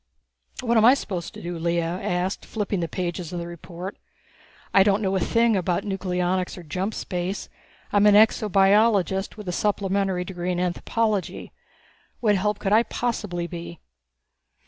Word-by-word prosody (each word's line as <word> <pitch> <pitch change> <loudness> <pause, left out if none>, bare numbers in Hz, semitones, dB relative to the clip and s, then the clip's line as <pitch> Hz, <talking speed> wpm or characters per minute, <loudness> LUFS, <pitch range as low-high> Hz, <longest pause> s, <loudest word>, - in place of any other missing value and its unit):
"What 235 -2 +2
am 220 - +5
I 250 +3 +8
supposed 185 -10 -5
to - - -9
do?" 175 -1 -4
Lea 170 +1 +1
asked, 180 +2 -2
flipping 205 -3 -2
the 170 - -1
pages 175 -1 -4
of 175 - -4
the 170 - -5
report. 175 +2 -8 0.8
"I 195 - +7
don't 200 +2 +3
know 195 0 0
a - - +2
thing 230 +3 +2
about 180 -2 0
nucleonics 185 -2 -1
or 180 - -9
jump 185 +7 -3
space. 180 +1 -4 0.4
I'm 205 0 +5
an 205 - +6
exobiologist, 200 -2 +3
with 210 -3 -9
a - - -1
supplementary 195 -1 0
degree 180 -1 -3
in 175 - -2
anthropology. 200 +3 -1 0.7
What 210 -3 +3
help 210 +2 0
could 200 0 -1
I 220 - +7
possibly 215 -7 -3
be?" 170 -1 -8
190 Hz, 160 wpm, -24 LUFS, 175-210 Hz, 0.8 s, I